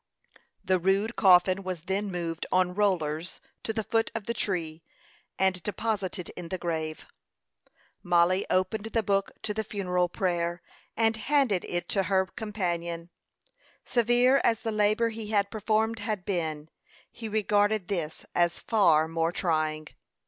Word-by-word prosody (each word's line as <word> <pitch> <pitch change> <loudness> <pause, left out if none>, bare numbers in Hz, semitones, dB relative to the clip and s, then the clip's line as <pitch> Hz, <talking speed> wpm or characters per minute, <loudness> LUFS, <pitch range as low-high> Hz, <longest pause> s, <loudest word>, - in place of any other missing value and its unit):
The 185 -1 +2
rude 195 +5 +1
coffin 185 0 +5
was 185 -3 -5
then 195 +4 -2
moved 170 -2 -3
on 185 -1 +2
rollers 175 -5 0 0.2
to - - -3
the 220 0 -2
foot 225 +1 +1
of 225 -3 -4
the 235 - -1
tree, 170 -7 -2 0.6
and 190 -1 +1
deposited 200 -2 -2
in 175 -2 -8
the 185 - -2
grave. 160 -3 -3 1.0
Mollie 175 +1 +2
opened 185 +4 0
the 225 0 -1
book 195 0 0
to 210 - -2
the 220 +1 -2
funeral 180 -4 -1
prayer, 175 -1 -1 0.3
and 225 0 +2
handed 235 -4 +2
it 175 0 -3
to 195 - +2
her 190 0 +2
companion. 175 -6 -4 0.7
Severe 245 +2 +3
as 225 -2 +2
the 225 - -2
labor 215 +2 +2
he 225 -1 -6
had 200 -2 +1
performed 220 +1 0
had 205 -4 -3
been, 160 -5 -2 0.4
he 225 -1 -7
regarded 210 -2 +1
this 165 -6 -3
as 175 -1 +2
far 165 -8 +3
more 165 0 0
trying. 155 -3 -1
190 Hz, 145 wpm, -28 LUFS, 175-215 Hz, 1.0 s, coffin